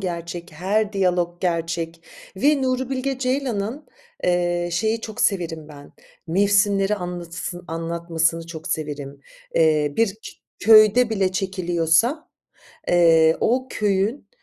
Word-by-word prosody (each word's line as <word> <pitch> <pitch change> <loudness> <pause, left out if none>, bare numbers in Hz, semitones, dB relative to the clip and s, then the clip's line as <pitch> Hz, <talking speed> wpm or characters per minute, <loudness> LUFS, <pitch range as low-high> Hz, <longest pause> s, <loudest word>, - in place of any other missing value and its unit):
gerçek, 170 -2 -5
her 205 +6 -1
diyalog 180 -3 0
gerçek 170 -1 -2 0.3
ve 280 +5 +2
Nuri 255 0 -1
Bilge 265 0 -2
Ceylan'ın, 255 -1 -2 0.4
eee, 175 -1 +1
şeyi 220 +6 0
çok 225 +1 -7
severim 165 -6 -1
ben, 145 -1 -13 0.3
mevsimleri 200 +2 +2
anlatısı 175 -1 -6
anlatmasını 165 0 -1
çok 165 0 -8
severim. 145 -2 -4 0.3
Eee, 155 -3 +3
bir 225 -4 +2 0.4
köyde 220 +2 +6
bile 195 -4 0
çekiliyorsa, 185 - 0 0.6
eee, 165 -2 +5
o 255 +3 +1
köyün 205 +5 -1
180 Hz, 110 wpm, -22 LUFS, 165-215 Hz, 0.6 s, köyde